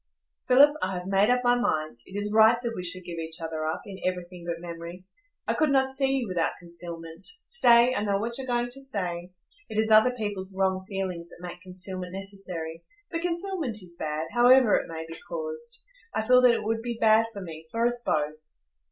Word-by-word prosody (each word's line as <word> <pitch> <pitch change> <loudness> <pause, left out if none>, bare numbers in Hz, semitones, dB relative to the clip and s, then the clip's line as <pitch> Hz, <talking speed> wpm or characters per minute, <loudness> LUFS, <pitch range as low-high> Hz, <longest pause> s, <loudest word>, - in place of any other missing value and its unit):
"Philip, 280 +3 +7
I 185 0 -1
have 180 - -6
made 195 +3 +3
up 250 0 +2
my 245 0 +4
mind; 155 - -1
it 195 +2 -5
is 205 0 -3
right 220 +2 +6
that 235 -1 -2
we 180 - -5
should 185 +1 -6
give 170 -1 -6
each 160 +1 -5
other 160 -1 -3
up, 160 - -3
in 195 -2 -9
everything 180 -1 -4
but 170 -1 -3
memory. 170 +1 -8 0.4
I - - +2
could 310 - +2
not 265 -1 +3
see 270 0 +1
you 235 - -3
without 175 -3 0
concealment—stay, 180 - +1
I 205 - -1
know 200 -1 +1
what 230 +3 -2
you 265 - -4
are - - -14
going 240 -1 0
to 275 +2 -4
say,—it 185 +1 -4
is 220 0 +2
other 220 +4 +6
people's 200 -3 -4
wrong 190 -1 +1
feelings 185 -4 -4
that - - -14
make 175 0 -9
concealment 185 -1 -1
necessary; 185 -4 -5 0.3
but 330 -1 -2
concealment 345 - -2
is 170 -1 -11
bad, 155 +1 -3
however 245 -1 +6
it - - -1
may 160 0 -5
be 165 0 -9
caused. 470 -1 -5 0.3
I 220 - 0
feel 250 0 +7
that 245 -2 +6
it - - -3
would 225 +1 -1
be 235 0 -4
bad 220 0 +5
for 200 - -8
me, 160 -2 -9
for 230 +7 0
us 240 0 +1
both. 150 -4 0
195 Hz, 210 wpm, -27 LUFS, 175-245 Hz, 0.4 s, Philip